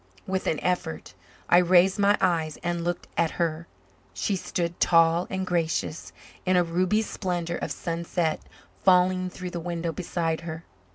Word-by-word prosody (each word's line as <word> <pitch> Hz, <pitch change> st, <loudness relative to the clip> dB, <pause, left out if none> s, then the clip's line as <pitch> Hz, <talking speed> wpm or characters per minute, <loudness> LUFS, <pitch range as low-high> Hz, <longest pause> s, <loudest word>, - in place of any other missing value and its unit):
With 190 Hz, 0 st, -2 dB
an 155 Hz, -, +1 dB
effort 180 Hz, -, -2 dB, 0.3 s
I 175 Hz, -, +6 dB
raised 180 Hz, +2 st, +4 dB
my 205 Hz, +1 st, +4 dB
eyes 165 Hz, -4 st, +1 dB
and 175 Hz, -1 st, -1 dB
looked 175 Hz, 0 st, -2 dB
at 170 Hz, -1 st, +3 dB
her. 170 Hz, -1 st, -1 dB, 0.5 s
She 205 Hz, -, 0 dB
stood, 175 Hz, -2 st, -3 dB
tall 165 Hz, +1 st, +4 dB
and 190 Hz, 0 st, -2 dB
gracious, 165 Hz, -2 st, -1 dB, 0.3 s
in 185 Hz, 0 st, +2 dB
a 180 Hz, -, +5 dB
ruby 185 Hz, +6 st, +1 dB
splendour 175 Hz, -5 st, -3 dB
of -, -, -4 dB
sunset 170 Hz, -1 st, -2 dB, 0.4 s
falling 185 Hz, 0 st, +4 dB
through 180 Hz, 0 st, -7 dB
the 175 Hz, -, -4 dB
window 170 Hz, 0 st, -3 dB
beside 165 Hz, -1 st, -2 dB
her. 165 Hz, -1 st, -6 dB
175 Hz, 155 wpm, -26 LUFS, 165-185 Hz, 0.5 s, I